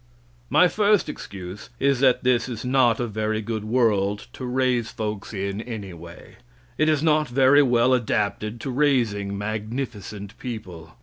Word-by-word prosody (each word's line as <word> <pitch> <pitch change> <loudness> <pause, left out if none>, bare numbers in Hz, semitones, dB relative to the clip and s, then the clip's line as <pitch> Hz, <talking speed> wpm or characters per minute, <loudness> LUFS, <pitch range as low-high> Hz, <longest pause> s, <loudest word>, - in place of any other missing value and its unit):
My 150 +6 +5
first 210 +1 +2
excuse 95 +1 -8
is 140 -1 +2
that 130 -2 +3
this 125 0 +2
is 115 -1 -6
not 125 -3 +3
a 120 - 0
very 110 0 -2
good 110 -1 -4
world 105 -3 +1
to 130 - -7
raise 125 -2 +1
folks 105 -2 -5
in 100 0 -3
anyway. 95 -8 -9 0.4
It 155 +3 +2
is 155 -1 +1
not 155 -1 +3
very 135 +3 +5
well 125 -1 +3
adapted 110 -2 -1
to 135 - -4
raising 115 -8 +1
magnificent 110 -1 -5
people. 90 -10 -8
115 Hz, 145 wpm, -24 LUFS, 105-130 Hz, 0.4 s, My